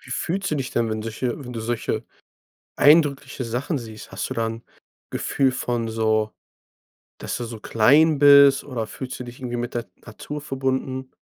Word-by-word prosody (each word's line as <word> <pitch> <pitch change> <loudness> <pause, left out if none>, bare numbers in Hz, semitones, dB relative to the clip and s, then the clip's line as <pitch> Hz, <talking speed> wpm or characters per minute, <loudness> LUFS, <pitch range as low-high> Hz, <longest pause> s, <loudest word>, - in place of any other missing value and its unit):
Wie 125 - -15
fühlst 190 +9 -2
du 155 - +1
dich 130 -2 -3
denn, 115 -1 0
wenn 110 0 -3
solche 120 +4 -3
wenn 125 - -7
du 115 - -5
solche 115 +1 -2 0.7
eindrückliche 145 -3 +4
Sachen 125 +6 -2
siehst? 110 -3 -10
Hast - - -4
du - - -3
da 115 -1 0
'n 115 +1 -5 0.5
Gefühl 135 -2 +1
von 120 -2 -2
so, 110 -1 +1 0.9
dass - - -4
du 120 - -4
so 115 -2 -8
klein 145 +9 +4
bist, 140 -1 +7
oder 120 -6 -4
fühlst 130 +2 -7
du 125 - -4
dich 120 +1 -11
irgendwie 120 -1 -4
mit 120 +1 -4
der 120 -1 -3
Natur 145 +7 -8
verbunden? 130 -1 -3
125 Hz, 180 wpm, -23 LUFS, 115-140 Hz, 0.9 s, bist